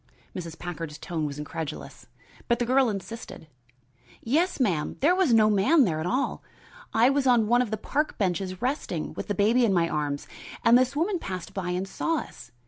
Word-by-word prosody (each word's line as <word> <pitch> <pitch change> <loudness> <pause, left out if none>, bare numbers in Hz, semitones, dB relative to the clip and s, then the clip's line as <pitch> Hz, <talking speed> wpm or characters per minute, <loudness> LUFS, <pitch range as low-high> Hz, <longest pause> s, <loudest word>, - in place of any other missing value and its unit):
Mrs. 165 -3 -6
Packard's 165 -3 -6
tone 165 -3 -3
was 140 -1 -6
incredulous. 150 +1 -7 0.4
But 235 - +2
the 240 - -1
girl 260 0 +3
insisted. 210 -3 -7 0.8
"Yes, 325 +10 +1
ma'am; 175 - 0
there 315 +6 +4
was 370 -7 +2
no 220 -2 +6
man 215 +10 +4
there 160 -5 -1
at 160 - -2
all. 255 +7 -1 0.5
I 235 +4 +4
was 275 -1 +1
on 240 -3 +4
one 240 +3 +3
of 250 - -1
the 220 - -2
park 295 +8 -2
benches 185 0 -2
resting, 250 - -2
with - - -6
the 205 - -1
baby 225 +6 +3
in 225 - +3
my 170 -2 +2
arms, 145 -2 -2 0.4
and 230 - +7
this 255 +2 +3
woman 350 +5 0
passed 185 - -6
by 185 -2 -3
and 180 +2 -2
saw 330 +11 -1
us. 125 - -8
215 Hz, 195 wpm, -26 LUFS, 175-255 Hz, 0.8 s, and